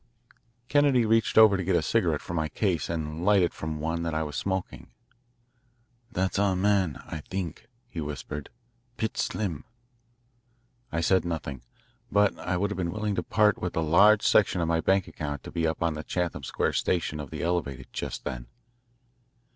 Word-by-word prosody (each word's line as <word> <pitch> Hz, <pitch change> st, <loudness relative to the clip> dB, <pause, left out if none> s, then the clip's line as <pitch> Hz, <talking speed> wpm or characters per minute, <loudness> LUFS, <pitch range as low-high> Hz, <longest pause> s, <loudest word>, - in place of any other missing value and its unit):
Kennedy 140 Hz, -5 st, +4 dB
reached 115 Hz, +1 st, +2 dB
over 110 Hz, -2 st, +8 dB
to 95 Hz, -, -1 dB
get 90 Hz, +1 st, +1 dB
a -, -, +3 dB
cigarette -, -, +1 dB
from 85 Hz, -, -5 dB
my 80 Hz, -1 st, 0 dB
case 90 Hz, 0 st, -1 dB
and 80 Hz, 0 st, -3 dB
light 100 Hz, -1 st, +5 dB
it 85 Hz, -, 0 dB
from 80 Hz, -1 st, -5 dB
one 80 Hz, +2 st, -2 dB
that 85 Hz, -1 st, -2 dB
I 80 Hz, -, +1 dB
was 75 Hz, -2 st, -6 dB
smoking. 95 Hz, -2 st, -3 dB, 1.2 s
"That's=20our 95 Hz, -1 st, +1 dB
man, 95 Hz, -6 st, +1 dB
I 80 Hz, -, -6 dB
think," 90 Hz, +4 st, -5 dB, 0.2 s
he 85 Hz, -9 st, -6 dB
whispered 75 Hz, 0 st, -6 dB, 0.5 s
"Pitts 110 Hz, -1 st, -1 dB
Slim." 85 Hz, -10 st, -3 dB, 1.3 s
I 85 Hz, -, -1 dB
said 95 Hz, +3 st, +3 dB
nothing, 80 Hz, -6 st, -4 dB, 0.5 s
but 105 Hz, 0 st, +3 dB
I 90 Hz, 0 st, -1 dB
would 100 Hz, +3 st, 0 dB
have 105 Hz, -, -4 dB
been 90 Hz, -2 st, -1 dB
willing 105 Hz, +2 st, -2 dB
to -, -, 0 dB
part 105 Hz, -2 st, +2 dB
with 90 Hz, -, -3 dB
a 80 Hz, -, +1 dB
large 100 Hz, +7 st, +5 dB
section 95 Hz, -3 st, +4 dB
of 85 Hz, -, 0 dB
my 80 Hz, 0 st, +1 dB
bank 95 Hz, +1 st, +2 dB
account 75 Hz, -3 st, -5 dB
to -, -, -8 dB
be 80 Hz, -1 st, 0 dB
up 80 Hz, +1 st, -2 dB
on 85 Hz, -1 st, +1 dB
the 75 Hz, -, -5 dB
Chatham 85 Hz, -4 st, -2 dB
Square 65 Hz, -, -1 dB
station 80 Hz, -4 st, 0 dB
of 75 Hz, -3 st, -6 dB
the -, -, -5 dB
Elevated 75 Hz, -7 st, -2 dB
just -, -, -4 dB
then. -, -, -5 dB
85 Hz, 180 wpm, -27 LUFS, 80-100 Hz, 1.3 s, over